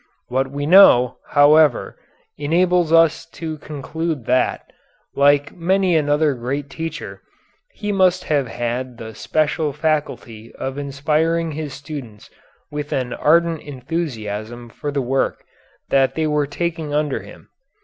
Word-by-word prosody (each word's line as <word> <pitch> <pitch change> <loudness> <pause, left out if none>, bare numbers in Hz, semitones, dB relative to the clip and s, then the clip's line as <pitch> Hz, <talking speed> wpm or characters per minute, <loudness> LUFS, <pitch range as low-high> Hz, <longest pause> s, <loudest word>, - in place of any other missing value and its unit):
What 130 +2 0
we 145 +1 -4
know, 130 -8 +6
however, 145 -1 +4 0.4
enables 170 +3 +1
us 165 -1 +4
to 160 -2 -6
conclude 150 -1 -4
that, 125 +2 +1 0.5
like 145 +1 +3
many 185 +1 +1
another 150 -1 +2
great 135 +3 -4
teacher, 160 +1 -6 0.5
he 210 -1 -3
must 185 -2 +2
have 145 -4 0
had 120 +1 -4
the 110 0 -8
special 155 +5 0
faculty 145 -7 -3
of 135 +1 -5
inspiring 155 +4 0
his 150 -2 -5
students 135 -7 -9 0.4
with 150 0 -5
an 125 -2 -2
ardent 165 +1 +2
enthusiasm 120 -6 -5
for 145 +5 -5
the 140 -2 -1
work 135 +2 -1 0.5
that 135 -1 +2
they 160 - 0
were 150 -1 +1
taking 160 0 -3
under 150 -2 0
him. - - -14
145 Hz, 130 wpm, -20 LUFS, 130-160 Hz, 0.5 s, know